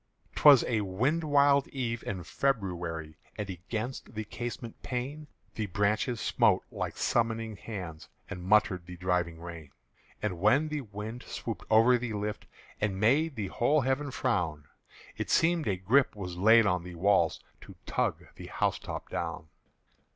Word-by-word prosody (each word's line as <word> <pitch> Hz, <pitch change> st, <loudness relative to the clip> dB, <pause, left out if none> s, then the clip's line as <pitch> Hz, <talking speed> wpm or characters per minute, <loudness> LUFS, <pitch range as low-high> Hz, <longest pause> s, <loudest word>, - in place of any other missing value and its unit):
'T -, -, -5 dB
was 140 Hz, -4 st, +10 dB
a 115 Hz, -3 st, 0 dB
wind 125 Hz, -, 0 dB
wild 140 Hz, -2 st, +4 dB
eve 115 Hz, -4 st, -3 dB
in 95 Hz, -3 st, -3 dB
February, 85 Hz, -, -2 dB, 0.2 s
And 105 Hz, -2 st, -3 dB
against 110 Hz, +8 st, -5 dB
the 110 Hz, -, -2 dB
casement 120 Hz, +1 st, -6 dB
pane 140 Hz, +4 st, -4 dB, 0.3 s
The 110 Hz, -2 st, -3 dB
branches 105 Hz, +5 st, 0 dB
smote -, -, +3 dB
like -, -, -4 dB
summoning 115 Hz, -1 st, 0 dB
hands 90 Hz, -7 st, -7 dB, 0.2 s
And 90 Hz, -, -7 dB
muttered 95 Hz, -3 st, +3 dB
the 90 Hz, -1 st, -8 dB
driving 90 Hz, -2 st, -1 dB
rain. 85 Hz, -3 st, -9 dB, 0.5 s
And 95 Hz, -5 st, -3 dB
when 130 Hz, -, +3 dB
the 150 Hz, -1 st, -2 dB
wind 110 Hz, +1 st, -7 dB
swooped 115 Hz, -, -6 dB
over 115 Hz, +3 st, +5 dB
the 115 Hz, -2 st, -4 dB
lift 105 Hz, 0 st, -4 dB, 0.3 s
And 100 Hz, -2 st, -1 dB
made 140 Hz, +8 st, +3 dB
the 100 Hz, -5 st, -3 dB
whole 145 Hz, +9 st, +2 dB
heaven 135 Hz, +3 st, 0 dB
frown, 90 Hz, -, -1 dB, 0.5 s
It -, -, -3 dB
seemed 165 Hz, -2 st, +3 dB
a 100 Hz, -, +1 dB
grip 115 Hz, +10 st, +3 dB
was 90 Hz, -4 st, -6 dB
laid 110 Hz, +5 st, +6 dB
on 90 Hz, -3 st, +1 dB
the 90 Hz, 0 st, -9 dB
walls 90 Hz, -2 st, +2 dB, 0.3 s
To -, -, -12 dB
tug -, -, -1 dB
the -, -, -8 dB
housetop -, -, -2 dB
down. 75 Hz, -, -4 dB
110 Hz, 155 wpm, -30 LUFS, 90-125 Hz, 0.5 s, was